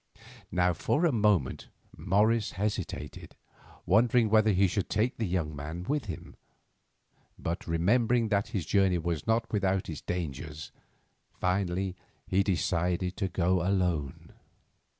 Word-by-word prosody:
Now 90 0 +2
for 145 - +1
a 165 - +3
moment 105 - +1 0.3
Morris 105 +3 +1
hesitated, 105 +2 -4 0.5
wondering 115 +2 +3
whether 110 -1 +5
he 95 0 +4
should 95 +1 -1
take 110 +5 0
the 110 - -1
young 85 -4 -2
man 80 +5 -6
with 145 +7 -1
him; 90 -7 -8 1.0
but 85 +1 -4
remembering 115 +8 +2
that 100 -1 +1
this 95 -6 -2
journey 95 +1 +3
was 85 -3 -3
not 115 +1 +1
without 95 -3 0
its 80 - -6
dangers, 80 -3 -5 0.7
finally 90 0 0 0.3
he 95 +1 +2
decided 90 -1 0
to 95 - 0
go 90 0 +1
alone. 90 -6 -1
95 Hz, 130 wpm, -29 LUFS, 85-105 Hz, 1.0 s, whether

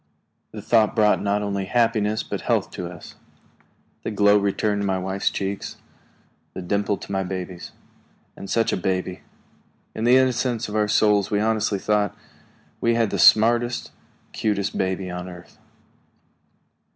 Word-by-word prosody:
The - - -8
thought 110 -2 +3
brought 105 -2 +3
not 100 +1 0
only 100 -1 -2
happiness 110 -1 +1
but - - -5
health - - 0
to 90 - -5
us. 85 -2 -11 0.9
The - - -4
glow 100 -1 +4
returned 100 +1 0
to - - -1
my 95 -1 0
wife's 95 +1 -1
cheek, 100 0 -4 0.9
the - - -5
dimple 100 +2 0
to - - -10
the 95 -1 0
baby's. 90 -1 -6 0.6
And 100 - -9
such 115 -1 +1
a - - 0
baby! 95 -1 -2 0.7
In 110 - -4
the 125 +2 +6
innocence 125 -2 +1
of 105 - -6
our 105 -1 +2
souls 105 -1 +3
we 105 - +1
honestly 110 -1 0
thought 105 -1 0 0.6
we 115 0 +2
had 115 -3 +1
the - - -2
smartest, 120 +2 +4 0.4
cutest 100 -2 -1
baby 95 -1 -2
on 90 +1 -6
earth. 90 -1 -13
105 Hz, 150 wpm, -23 LUFS, 95-110 Hz, 0.9 s, the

